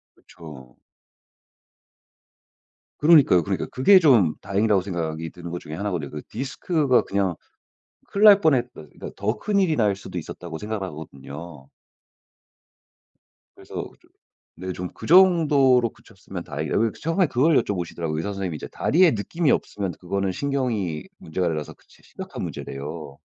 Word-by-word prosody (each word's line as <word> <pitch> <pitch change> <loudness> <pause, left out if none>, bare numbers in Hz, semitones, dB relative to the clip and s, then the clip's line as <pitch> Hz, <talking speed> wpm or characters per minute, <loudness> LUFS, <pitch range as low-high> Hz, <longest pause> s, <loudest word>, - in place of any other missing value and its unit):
그쵸. 70 -7 -14 2.2
그러니까요. 145 - +6
그러니까. - - -2
그게 185 +10 +6
좀 115 - +4
다행이라고 100 0 +1
생각이 80 -3 -4
드는 85 -2 -9
것 90 - -4
중에 75 - -9
1 100 +4 -3
거든요. 80 -6 -3
그 75 -1 -6
디스크가 135 - 0
그냥 95 -3 -1 0.7
'큰일 200 +2 +2
날 205 -1 +9
뻔했다. 130 -6 +2
그것보다 75 - -11
더 105 +4 -2
큰일이 195 -7 +1
날 105 -4 +2
수도 100 - -8
있었다.'고 85 -2 -7
생각을 105 -1 -4
하거든요. 75 -1 -10 1.9
그래서 - - -15 0.3
좀 - - -27 0.5
네 95 +1 -5
좀 90 0 -5
'그 - - -10
정도로 150 -9 +5
그쳤으면 - - -10
다행이다.' - - -4
왜냐면 115 0 +2
처음에 165 +3 +1
그걸 140 +4 +2
여쭤보시더라고요, 85 -4 -4
의사 80 - -3
선생님이. 95 -5 -4
"이제 - - -8
다리에 170 +1 +3
느낌이 145 +9 0
없으면 100 -3 -2
그거는 95 +1 -3
신경이 115 - -2
문제가 90 +2 -3
돼서 75 -3 -3
그게 - - -29
진짜 - - -22
심각한 - - -7
문제"래요. 70 +1 -7
100 Hz, 355 characters per minute, -23 LUFS, 85-140 Hz, 2.2 s, 날